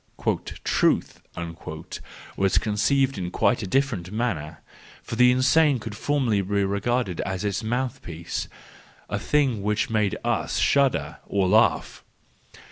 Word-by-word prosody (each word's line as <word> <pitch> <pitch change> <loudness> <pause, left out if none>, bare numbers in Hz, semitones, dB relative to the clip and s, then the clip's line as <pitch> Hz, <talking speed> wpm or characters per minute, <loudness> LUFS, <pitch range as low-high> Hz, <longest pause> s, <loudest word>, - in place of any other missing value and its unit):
" - - -7
Truth - - +1 0.6
" - - -12
was 95 -1 +2
conceived 130 +4 +1
in 90 -1 -3
quite 120 +6 +1
a 100 - -4
different 105 -6 0
manner, 85 -9 -3 0.4
for - - -5
the 125 +1 +6
insane 130 +3 +4
could 110 -2 -7
formerly 125 -4 +1
be 100 +1 0
regarded 100 0 -1
as 95 +1 -3
its 100 +1 -1
mouthpiece—a 120 -8 -5
thing 135 -8 +1
which 105 +2 0
makes 105 -3 +1
^shudder, 140 -2 +1
or 100 -2 +1
laugh. 110 +4 +2
110 Hz, 125 wpm, -25 LUFS, 100-130 Hz, 0.6 s, the